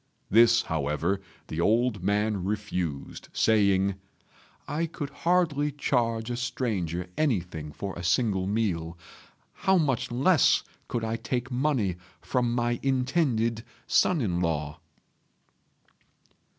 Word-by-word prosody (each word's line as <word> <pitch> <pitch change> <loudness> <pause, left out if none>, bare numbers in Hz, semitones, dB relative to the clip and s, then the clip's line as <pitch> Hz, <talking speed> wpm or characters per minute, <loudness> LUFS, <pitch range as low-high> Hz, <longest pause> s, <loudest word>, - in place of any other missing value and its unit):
This, 115 +2 +6
however, 80 +5 -1 0.2
the 80 - -3
old 115 +2 +2
man 105 0 +1
refused, 90 -7 -4
saying, 100 -3 +3 0.7
"I 165 +3 -1
could 150 -3 -6
hardly 165 -5 +1
charge 115 -4 0
a 120 - -2
stranger 105 -9 -2
anything 90 - -1
for 95 +5 -5
a 90 - -6
single 95 +1 +1
meal; 90 -6 -1 0.6
how 190 -1 +2
much 140 -8 0
less 140 +8 +4 0.2
could 120 - -2
I 110 +1 -1
take 125 +2 -3
money 125 - 0 0.2
from 125 -2 0
my 120 -1 0
intended 125 -4 +1 0.2
son 175 -5 +3
in 90 -7 0
law?" 75 -3 -2
115 Hz, 110 wpm, -27 LUFS, 95-125 Hz, 0.7 s, This